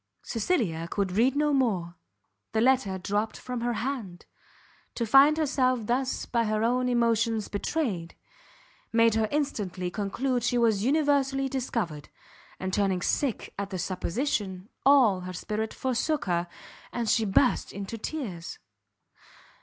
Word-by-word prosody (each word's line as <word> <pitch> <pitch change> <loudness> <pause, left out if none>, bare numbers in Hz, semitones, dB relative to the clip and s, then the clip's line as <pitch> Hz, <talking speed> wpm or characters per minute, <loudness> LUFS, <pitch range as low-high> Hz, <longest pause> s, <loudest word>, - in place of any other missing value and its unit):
Cecilia 210 - -1
could 195 -1 -1
read 235 +8 +3
no 295 0 +2
more; 200 -11 +1 0.6
the 220 - +2
letter 240 -6 +3
dropt 205 +4 -2
from 250 -2 -5
her 240 0 0
hand; 230 -8 -4 0.7
to 235 - -1
find 275 +7 +6
herself 255 -6 +1
thus 255 +3 -1
by 235 -1 0
her 215 0 0
own 250 +2 +1
emotions 230 -2 +1
betrayed, 205 - -2 0.8
made 230 -1 +4
her 220 0 +1
instantly 200 - -2
conclude 245 +6 -1
she 245 0 +1
was 220 -4 +2
universally 275 -1 +2
discovered; 230 - -3 0.5
and 185 0 -3
turning 190 -3 +1
sick 275 -6 -1
at 200 -1 -3
the 190 - -4
supposition, 190 - -2 0.2
all 250 -9 +6
her 185 0 -6
spirit 215 +4 -3
forsook 260 +4 -1
her, 175 -1 0 0.4
and 235 -2 -2
she 225 +1 +3
burst 220 +5 +2
into 200 +3 -6
tears. 220 - -5
230 Hz, 135 wpm, -27 LUFS, 195-260 Hz, 0.8 s, find